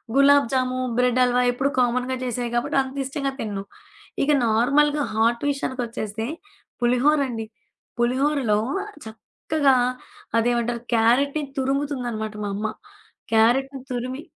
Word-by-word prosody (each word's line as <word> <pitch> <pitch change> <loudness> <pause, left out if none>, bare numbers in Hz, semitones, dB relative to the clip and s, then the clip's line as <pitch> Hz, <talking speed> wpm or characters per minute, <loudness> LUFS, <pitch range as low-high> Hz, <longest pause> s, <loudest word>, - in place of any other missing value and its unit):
Gulab jamun, 270 -2 +3 0.2
bread 250 0 +2
halwa 250 0 +2
ఎప్పుడు 265 +3 0
కామన్‌గా 250 +1 +1
జేసేయి 245 -1 -3
కాబట్టి 240 +3 0
అంత 265 +1 -9
ఇష్టంగా 275 0 -2
తిను. 200 -3 -4 0.6
ఇక 300 - +2
నార్మల్‌గా 280 +7 +3
హాట్ 230 +2 +1
విషయానికొచ్చేస్తే 235 -5 -4 0.5
పులిహోరండి. 250 -1 +2 0.5
పులిహూరలో 255 -2 +2 0.5
చక్కగా 270 +6 0 0.6
అదేమంటారు 235 0 0
క్యారెట్‌ని 275 +7 +2
తురుముతుందనమాట 260 -6 -2
మా 200 - -3
అమ్మ. 215 +2 -2 0.7
క్యారెట్ 240 +5 +4 0.2
తురిమి 255 +3 -3
250 Hz, 100 wpm, -23 LUFS, 230-275 Hz, 0.7 s, క్యారెట్